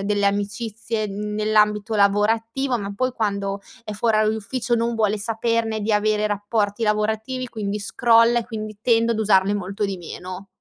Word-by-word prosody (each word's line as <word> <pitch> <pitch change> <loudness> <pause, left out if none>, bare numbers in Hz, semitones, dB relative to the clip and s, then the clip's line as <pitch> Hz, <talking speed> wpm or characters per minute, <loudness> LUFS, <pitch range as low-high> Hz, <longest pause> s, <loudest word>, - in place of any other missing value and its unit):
delle 205 0 +1
amicizie 215 +2 -2
nell'ambito 210 +1 0
lavorativo, 225 +6 +2
ma, 200 0 -5
poi, 255 +1 0
quando 200 -3 -2 0.2
è 215 - -5
fuor 220 +1 +1
orario 215 0 +3
d'ufficio 235 +3 -2
non 235 0 0
vuole 215 -1 +2
saperne 225 +1 -1
di 215 +1 -1
avere 210 0 +2
rapporti 205 +1 -1
lavorativi, 220 +4 -1
quindi 210 -2 -3
scrolla, 230 +2 +4
e 225 - -9
quindi 215 -3 -6
tendo 230 -1 +3
ad 220 - -3
usarne 200 -1 +3
molto 200 +2 -3
di 195 -1 -2
meno. 185 +2 -8
215 Hz, 160 wpm, -22 LUFS, 205-225 Hz, 0.2 s, scrolla